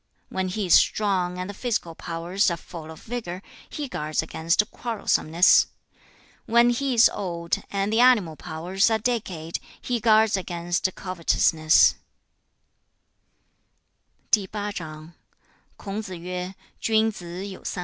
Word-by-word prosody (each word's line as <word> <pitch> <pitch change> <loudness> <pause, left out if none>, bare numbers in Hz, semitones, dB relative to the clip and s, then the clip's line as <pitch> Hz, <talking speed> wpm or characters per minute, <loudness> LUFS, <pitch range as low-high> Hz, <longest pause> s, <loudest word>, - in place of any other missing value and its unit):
When 190 0 -2
he 195 +2 -2
is 175 - +3
strong 185 -4 +3
and 180 0 -4
the 205 - -6
physical 210 -6 -2
powers 170 +5 -1
are 170 - -2
full 160 -1 -10
of 160 - -11
vigor, 220 -6 -5 0.3
he 295 -2 -5
guards 155 -8 -2
against 165 +5 +1
quarrelsomeness. 185 -7 +3 0.8
When 235 +1 +5
he 260 +1 -1
is 230 - +8
old, 170 -4 -3
and 200 +1 -1
the 225 - +3
animal 230 -10 +4
powers 175 +6 0
are 220 - +2
decayed, 195 -8 -3 0.2
he 245 -1 -2
guards 220 -1 +4
against 175 -1 -1
covetousness.' 165 -3 +3
185 Hz, 100 wpm, -25 LUFS, 170-220 Hz, 0.8 s, is